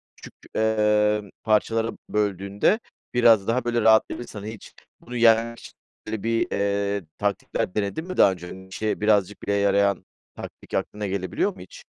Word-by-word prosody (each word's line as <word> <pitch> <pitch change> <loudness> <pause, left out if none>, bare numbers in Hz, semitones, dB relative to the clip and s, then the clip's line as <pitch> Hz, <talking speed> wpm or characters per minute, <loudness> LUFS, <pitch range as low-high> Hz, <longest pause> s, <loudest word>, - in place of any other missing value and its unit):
küçük, - - -13 0.2
emm, 105 -1 +2
parçalara 110 +1 +1 0.2
böldüğünde 100 - +1 0.3
biraz 115 -5 +5
daha, 125 +3 +1
böyle, 120 -1 +1
rahatlayabilirsin. 110 0 +2
Hani, 105 +2 -6
hiç 110 - -13 0.3
bunu 125 - -10
yenmek 115 0 +4
için, - - -12 0.3
böyle, 110 -2 -4
bir, 115 0 +1
eee, 100 0 0
taktikler 100 -2 -2
denedin 105 - -2
mi 185 - -6
daha 100 - +6
önce? 90 -1 -7
Hani, 95 +1 -10
işine 105 +3 -3
birazcık 105 -2 +2
bile 100 - -1
yarayan 100 -1 +2 0.3
taktik - - -11
aklına 105 -1 -2
gelebiliyor 100 - -1
mu - - -15
hiç? 90 - -12
105 Hz, 155 wpm, -24 LUFS, 100-115 Hz, 0.3 s, daha